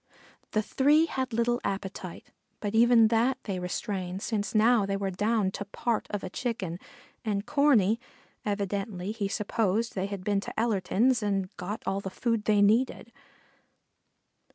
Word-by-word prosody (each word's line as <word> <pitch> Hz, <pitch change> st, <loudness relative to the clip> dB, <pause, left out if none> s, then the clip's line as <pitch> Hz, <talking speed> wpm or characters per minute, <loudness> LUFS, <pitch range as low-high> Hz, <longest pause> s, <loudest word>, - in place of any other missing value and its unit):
The 215 Hz, -, +2 dB
three 290 Hz, +8 st, +4 dB
had 260 Hz, -5 st, -3 dB
little 235 Hz, +2 st, +1 dB
appetite, 195 Hz, -2 st, -5 dB, 0.3 s
but 205 Hz, -1 st, -3 dB
even 230 Hz, -1 st, +6 dB
that 235 Hz, +3 st, +2 dB
they 195 Hz, -3 st, -3 dB
restrained 185 Hz, +1 st, -3 dB
since 215 Hz, -1 st, -2 dB
now 225 Hz, +1 st, +5 dB
they 195 Hz, 0 st, -1 dB
were 195 Hz, -1 st, -2 dB
down 205 Hz, +1 st, +1 dB
to 200 Hz, -, -5 dB
part 225 Hz, +2 st, -2 dB
of 205 Hz, -2 st, -3 dB
a 185 Hz, -, -4 dB
Chicken, 190 Hz, -9 st, -3 dB, 0.4 s
and 205 Hz, -2 st, -1 dB
Corney, 235 Hz, -7 st, +3 dB, 0.4 s
evidently 200 Hz, -1 st, -2 dB
he 215 Hz, -2 st, -2 dB
supposed 215 Hz, +2 st, 0 dB
they 190 Hz, 0 st, -2 dB
had 200 Hz, -2 st, -6 dB
been 205 Hz, 0 st, +1 dB
to -, -, -6 dB
Ellerton's 225 Hz, +2 st, +2 dB
and 195 Hz, -2 st, -1 dB
got 200 Hz, +5 st, -5 dB
all 195 Hz, +1 st, 0 dB
the 195 Hz, -, -5 dB
food 230 Hz, +1 st, -1 dB
they 205 Hz, -1 st, +4 dB
needed. 230 Hz, +2 st, +2 dB
210 Hz, 155 wpm, -28 LUFS, 195-230 Hz, 0.4 s, even